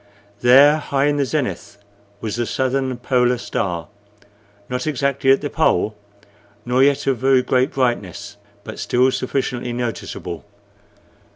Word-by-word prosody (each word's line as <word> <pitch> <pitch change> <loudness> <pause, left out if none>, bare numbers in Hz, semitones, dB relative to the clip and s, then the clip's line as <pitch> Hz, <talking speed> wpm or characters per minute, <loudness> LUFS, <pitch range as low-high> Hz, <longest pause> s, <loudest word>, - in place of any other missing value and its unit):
There, 140 +5 +6
high 140 -2 -1
in 145 0 +1
the 140 - +1
zenith, 135 -7 -3 0.4
was 110 -2 -3
the 120 -1 -2
southern 130 -1 -1
polar 125 0 +1
star, 90 -7 -3 0.8
not 125 +3 -3
exactly 140 -1 0
at 135 - +3
the 145 - -3
pole, 110 - +1 0.7
nor 125 +2 +2
yet 140 0 +3
of 135 -4 0
very 130 -1 +3
great 130 +2 +1
brightness, 120 - -2 0.3
but 110 - -8
still 125 +2 +2
sufficiently 125 -2 -2
noticeable. 115 -7 -5
125 Hz, 130 wpm, -20 LUFS, 120-135 Hz, 0.8 s, There